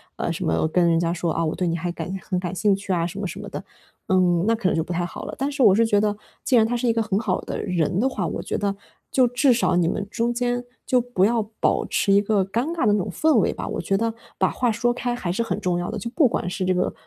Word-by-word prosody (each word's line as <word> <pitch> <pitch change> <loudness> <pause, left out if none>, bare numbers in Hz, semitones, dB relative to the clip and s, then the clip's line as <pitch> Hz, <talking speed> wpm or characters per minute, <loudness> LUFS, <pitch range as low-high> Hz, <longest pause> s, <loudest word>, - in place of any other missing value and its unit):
呃， - - -2
什 - - -3
么 80 - +1
跟 170 +1 +3
人 165 - +3
家 170 0 0
说， 175 -1 -2
啊， 165 - -1
我 155 - -1
对 180 - -1
你 165 - 0
还 175 +1 -3
感 175 - -6
很 185 - -2
感 180 -1 -4
兴 205 +2 +3
趣 195 0 -6
啊 170 -2 +1
什 180 +3 -6
么 200 - -2
什 185 - -7
么 205 0 -7
的， - - -5 0.5
嗯， 180 -2 +3
那 230 - +4
可 220 -4 -1
能 - - 0
就 160 - +1
不 175 - -5
太 175 +1 -1
好 175 - -7
了。 - - -6
但 275 +2 -1
是 280 -1 -3
我 205 -6 +7
是 230 +2 +4
觉 210 -2 +3
得， 210 0 0 0.3
既 260 - +3
然 225 -2 +6
他 240 +2 -1
是 240 - -1
一 230 - +3
个 225 0 +1
很 210 -2 0
好 220 - -1
的 - - -5
人 180 -1 0
的 250 - +3
话， 210 -9 -2
我 160 - -3
觉 - - -3
得， 200 -1 0 0.4
就 255 -2 +4
至 250 +3 +3
少 235 -6 +1
你 175 -2 +2
们 205 +1 -3
中 230 +3 -1
间， 245 0 -1 0.2
就 250 -1 +3
不 235 -6 +1
要 230 +1 +2 0.2
保 - - +2
持 195 - +1
一 200 - +6
个 205 -2 +1
尴 230 +8 -1
尬 330 -7 0
的 205 - +4
那 210 - +2
种 - - -5
氛 315 -1 +2
围 - - +1
吧。 - - -6
我 - - -3
觉 195 - 0
得， 225 +2 0 0.2
把 - - +2
话 245 -2 0
说 240 +2 +1
开 245 0 -2
还 190 -8 -3
是 230 +5 0
很 225 - -2
重 180 -4 0
要 175 0 -3
的。 - - -4
就 235 - -4
不 280 -2 +4
管 180 - -2
是 185 +1 -3
这 185 0 +2
个， 180 0 0
205 Hz, 330 characters per minute, -23 LUFS, 180-235 Hz, 0.5 s, 我